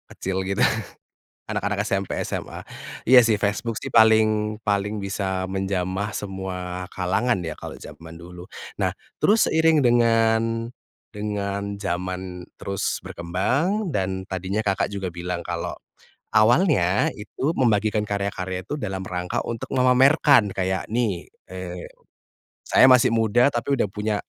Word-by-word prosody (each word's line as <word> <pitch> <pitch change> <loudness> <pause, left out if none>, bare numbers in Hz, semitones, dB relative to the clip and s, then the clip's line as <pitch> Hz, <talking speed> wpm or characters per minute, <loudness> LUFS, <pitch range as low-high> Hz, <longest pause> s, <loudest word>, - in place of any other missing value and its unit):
kecil 95 0 -3
gitu, 100 - +1 0.9
anak-anak 105 0 -1
SMP, 100 -1 -1
SMA. - - -5 0.5
Iya, 125 -1 +8
sih, 110 -2 +2
Facebook 110 +2 -1
sih - - -5
paling 110 -1 +4
paling 105 0 -1
bisa 95 -1 -2
menjamah 95 +1 -2
semua 90 -2 -5
kalangan 95 +4 0
ya, 85 -2 -5
kalau - - -9
zaman 80 +1 -11
dulu. 90 +1 -10 0.3
Nah, - - 0 0.3
terus 215 +2 +4
seiring 160 -1 +4
dengan 115 -2 +2 0.4
dengan 100 -1 -4
zaman 90 -1 -4 0.2
terus 100 -1 -2
berkembang, 140 - -1
dan 95 - -2
tadinya 95 +3 -2
Kakak 100 -1 -1
juga 95 -2 -3
bilang 90 0 -4
kalau 85 0 -4 0.6
awalnya 110 - +3
itu 130 +8 -3
membagikan 110 -5 +1
karya-karya 95 -2 -3
itu 145 - -5
dalam 95 -4 -4
rangka 90 -1 -3
untuk 115 -1 -5
memamerkan, 130 -1 +5
kayak, 95 0 -1
"Nih, 110 -6 -1 0.2
eee, 90 -1 -6 0.8
saya - - +5
masih 130 0 +6
muda 115 +3 +3
tapi 120 +3 -1
udah 110 -6 0
punya 105 +1 -2
100 Hz, 125 wpm, -23 LUFS, 95-115 Hz, 0.9 s, Iya